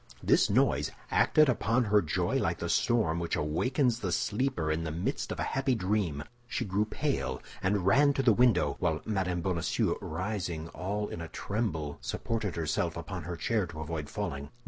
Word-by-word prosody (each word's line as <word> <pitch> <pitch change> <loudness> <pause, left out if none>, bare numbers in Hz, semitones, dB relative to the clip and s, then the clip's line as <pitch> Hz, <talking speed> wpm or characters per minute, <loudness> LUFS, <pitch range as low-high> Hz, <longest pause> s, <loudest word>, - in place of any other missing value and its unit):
This - - +4
noise - - +2 0.2
acted 155 -1 +5
upon 120 -1 +2
her 105 -1 +4
joy 80 -4 0
like - - 0
the - - -4
storm 105 -9 +2
which 85 - -1
awakens 115 - +1
the 95 -5 -2
sleeper 105 -6 0
in 80 +1 -1
the 80 - -3
midst 85 +4 -2
of - - -4
a - - 0
happy 135 -1 +1
dream; 95 -8 -1 0.2
she 125 -1 -2
grew 100 +2 +1
pale 105 - -2 0.2
and 95 -1 +1
ran 140 +9 +5
to 135 - 0
the 115 - +6
window, 105 - +3
while 80 -3 0
Mme. 95 -4 -1
Bonacieux, 85 -2 0
rising 85 -2 -3
all 105 +4 -3
in 85 - -6
a 85 - -5
tremble, 80 -9 -3
supported 110 -4 -2
herself 80 0 -1
upon 85 0 -6
her 85 +1 -4
chair 105 +2 0
to 80 -2 -9
avoid 80 -1 -4
falling. 70 +1 -4
95 Hz, 180 wpm, -30 LUFS, 80-110 Hz, 0.2 s, the